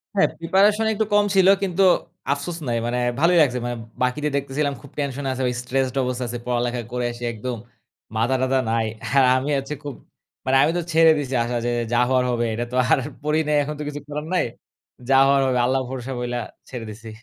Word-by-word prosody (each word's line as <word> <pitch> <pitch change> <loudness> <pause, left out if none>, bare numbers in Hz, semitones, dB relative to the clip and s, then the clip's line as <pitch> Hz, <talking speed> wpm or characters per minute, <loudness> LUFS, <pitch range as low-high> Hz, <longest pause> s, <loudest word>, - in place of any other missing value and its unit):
হ্যাঁ 195 - +4
প্রিপারেশন 200 +6 +3
একটু 220 +1 0
কম 205 0 +5
ছিল 190 -1 +5 0.2
কিন্তু, 190 0 +1 0.5
আফসোস 155 +4 -5
নাই। 120 -1 0
মানে 120 +1 -1 0.2
ভালোই 170 +3 +4
লাগছে। 125 -4 +2
মানে 120 0 -2 0.3
বাকিদের 145 +4 0
দেখতেছিলাম 140 +1 -1
খুব 140 - -14
টেনশন 140 -1 -3
আছে। 130 0 -3 0.2
স্ট্রেসড 130 +1 -1
অবস্থা 125 0 -2
আছে, 120 +1 -4
পড়ালেখা 120 0 -1
করে 125 0 -2
আসি 120 0 -9
একদম 120 +2 -4 0.6
মাথা 120 +4 +2
টাথা 130 0 +2
নাই। 115 -1 +1 0.3
আর 135 - +7
আমি 130 +3 -1
হচ্ছে 135 +2 -4
খুব 145 -1 -5 0.5
মানে 130 - +2
আমি 155 - +3
তো - - 0
ছেড়ে 165 0 +7
দিছি 135 -3 -3
আসা 120 +1 -3
যে - - +1 0.2
যা - - +3
হওয়ার 130 -1 +3
হবে। 120 -1 0
এটা 120 +2 -2
তো - - -4 0.2
আর - - +5 0.2
পড়ি 150 +1 +1
নাই, 150 - +2
এখন 150 +2 -5
তো - - -3
কিছু 145 0 -5
করার 150 +1 -5
নাই। 180 - +2 0.6
যা - - +4
হওয়ার 140 0 +4
হবে। 130 -1 +1
আল্লাহ 130 +2 +2
ভরসা 130 0 -5
বইলা 120 0 -2 0.3
ছেড়ে 120 -3 -6
দিছি। 110 +2 -10
135 Hz, 205 wpm, -22 LUFS, 125-150 Hz, 0.6 s, আর